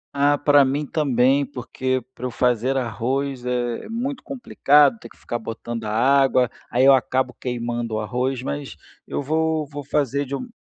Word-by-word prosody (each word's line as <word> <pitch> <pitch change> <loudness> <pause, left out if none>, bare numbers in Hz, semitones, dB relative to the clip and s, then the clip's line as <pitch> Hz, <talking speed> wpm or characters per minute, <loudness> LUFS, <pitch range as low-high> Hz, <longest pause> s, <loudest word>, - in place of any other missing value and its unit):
Ah 145 +1 +3
para 145 -1 +5
mim 140 +3 -1
também 135 -2 +2
porque 130 -1 -3
para 125 - -12
eu - - -4
fazer 125 +2 +1
arroz 130 +2 -2
é 120 - -2
muito 255 +4 -3
complicado 145 - +3
ter 115 - -11
que - - -20
ficar 120 - -4
botando 115 0 -6
a - - -3
água, 130 +1 +3 0.2
aí 125 +3 +3
eu 135 - +8
acabo 130 +1 +1
queimando 120 -2 -3
o - - -1
arroz, 125 +4 -2
mas 140 - -5 0.3
eu 145 - -3
vou 160 +1 0
vou 145 0 -8
fazer 140 0 0
de 140 +1 -4
um 250 - -6
130 Hz, 175 wpm, -22 LUFS, 120-145 Hz, 0.3 s, eu